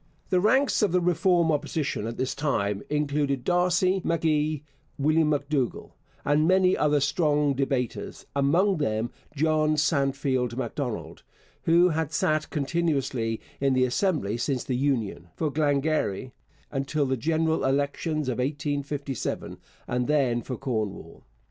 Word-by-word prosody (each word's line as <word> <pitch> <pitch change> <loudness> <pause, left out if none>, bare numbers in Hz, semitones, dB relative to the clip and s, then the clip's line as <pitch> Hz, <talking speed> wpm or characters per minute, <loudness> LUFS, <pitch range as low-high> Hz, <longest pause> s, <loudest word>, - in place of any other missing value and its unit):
The 185 - +4
ranks 260 +9 +3
of 205 -4 +2
the 180 - +3
Reform 175 -1 +2
Opposition 150 -6 -2
at 115 - -5
this 130 - -1
time 105 -9 -1
included 145 -3 0
D'Arcy 180 +2 +2
M'Gee, 155 -2 0 0.3
William 155 +2 +3
M'Dougall, 145 -3 -1 0.3
and 150 +2 +3
many 185 0 +4
other 150 -1 +2
strong 145 0 +2
debaters, 135 -3 -2
among 170 +8 +3
them 115 -5 -1 0.2
John 155 +1 +2
Sandfield 135 -5 0
Macdonald, 130 -3 -4 0.4
who 170 +2 +5
had 160 -2 -1
sat 155 0 0
continuously 140 -7 -1 0.2
in 135 -1 +2
the 130 0 +4
Assembly 130 - 0
since 125 +1 -1
the 130 - -2
Union 120 -10 -1
for 155 -2 -1
Glengarry 145 -6 0 0.4
until 140 +1 -1
the 130 0 0
general 160 +5 0
elections 145 +2 0
of 125 -1 -2
1857, 140 -1 -3 0.3
and 125 0 -1
then 135 -5 +2
for 125 +1 -5
Cornwall. 105 -10 -4
145 Hz, 130 wpm, -26 LUFS, 130-160 Hz, 0.4 s, who